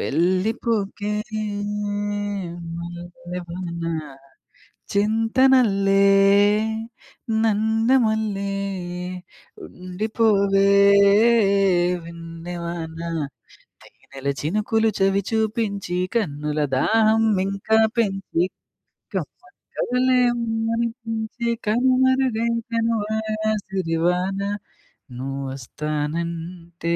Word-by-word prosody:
వెళ్ళిపోకే 200 - 0 1.7
మల్లెవాన. 175 0 -7 1.1
చెంతనల్లే, 215 -2 +3 1.4
నన్ను 220 +3 +2
మల్లే, 210 -3 -1 1.1
ఉండిపోవే 200 +1 +1 1.4
వెన్నె 165 +1 -8
వాన. 165 -1 -5 0.9
తేనెల 135 0 -9
చినుకులు 215 +7 +1
చవి 195 +1 +2
చూపించి, 215 -4 -1 0.2
కన్నుల 150 -8 -1 0.2
దాహం 220 +8 +3 0.2
ఇంకా 195 +3 +1 0.2
పెంచి, 195 -5 0 0.7
కమ్మని 365 +2 -7 0.2
కలలే 250 +1 +2 0.3
ఉమ్మనిపించి, 225 0 -2 0.2
కనుమరుగై 255 0 +2 0.2
తనువార 220 -1 -1 0.3
సిరివాన. 180 0 0 0.8
నువ్వొస్తానంటే, 155 +6 -4
200 Hz, 50 wpm, -22 LUFS, 170-225 Hz, 1.7 s, చెంతనల్లే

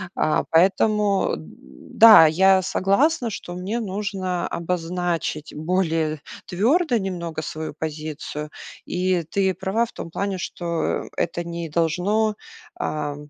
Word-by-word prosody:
А, 155 - +1
поэтому 200 +4 +3
да, 160 - +5
я 190 +4 +4
согласна, 230 - +1
что 175 -4 -7
мне 195 +6 -3
нужно 195 -4 -3
обозначить 170 -2 -3
более 160 -2 -1 0.3
твёрдо 245 - +2
немного 170 -5 -4
свою 155 0 -5
позицию. 150 -1 -5 0.4
И 180 -1 0
ты 190 +4 0
права 190 +6 0
в 235 - -14
том - - -7
плане, 195 +2 -2
что 170 -1 -2
это 170 +1 -1
не 170 -1 -5
должно 180 +7 +1 0.5
а, 150 - -2
180 Hz, 115 wpm, -23 LUFS, 160-200 Hz, 0.5 s, да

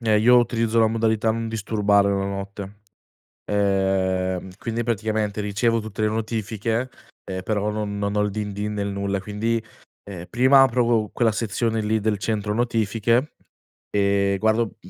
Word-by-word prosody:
ehm, 110 -2 +2
io 125 +3 +6
utilizzo 115 -1 +1
la 110 - +4
modalità 110 0 +1
"non 115 0 -2
disturbare" 105 -2 +2
la 100 -1 0
notte. 100 +1 -6 0.7
Ehm, 95 -2 0
quindi 115 0 -3
praticamente 110 -2 -1
ricevo 105 +3 +1
tutte 110 0 -6
le 110 - +3
notifiche, 110 +2 -2 0.3
ehm, 95 -1 -5
però 105 +1 -1
non 105 -1 -3
non 100 0 -1
ho - - +3
il 105 - 0
"din 105 0 -4
din" 105 +1 -3
nel 100 -1 -2
nulla. 100 0 -2
Quindi, 110 +3 -1 0.4
ehm, 90 -3 -8
prima 130 +4 +5
apro 125 -2 +3
qu 115 -3 +1
quella 115 -2 +2
sezione 115 +1 -1
lì 110 +1 +1
del 105 -1 0
centro 105 +1 -2
notifiche, 115 +3 0 0.5
ehm, 100 -1 +2
guardo 110 +1 +1
105 Hz, 155 wpm, -23 LUFS, 100-115 Hz, 0.7 s, io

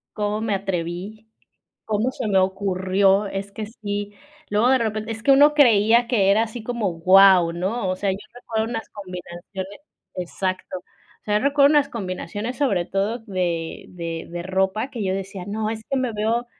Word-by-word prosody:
¿Cómo 210 0 -1
me 225 -2 -1
atreví, 195 +3 -4 0.6
cómo 220 +4 0
se 245 - -4
me 195 -2 +2
ocurrió? 190 +1 +2
Es 195 +1 -5
que 215 - -5
sí, 205 -2 -5 0.4
luego 210 +4 +2
de 265 - +5
repente 220 -2 -2
es 225 +1 -10
que 275 - +5
uno 290 +2 +7
creía 235 -4 +5
que 200 -6 +3
era 215 +3 +4
así 225 0 -7
como 235 -3 -1
wao, 180 0 +6
¿no?, 190 +5 -2
o 185 - 0
sea, 195 0 -1
yo 190 - -3 0.2
recuerdo 225 -3 -3
unas 225 0 -5
combinaciones, 185 0 -8 0.4
exacto. 185 +1 -3
O - - -30
sea, 210 0 +1
yo - - -5
recuerdo 280 0 +5
unas 295 -2 +4
combinaciones, 210 +2 -5
sobre 200 -12 +1
todo 200 +6 -1
de 180 -6 -3
de 165 -2 -6
de 175 0 -5
ropa 190 +6 0
que 240 -4 -6
yo 190 -2 0
decía: 195 -1 -5
"No, 215 +1 -2
es 220 0 -4
que 275 - 0
me 255 -2 -1
veo 225 +3 0
205 Hz, 180 wpm, -23 LUFS, 190-225 Hz, 0.6 s, uno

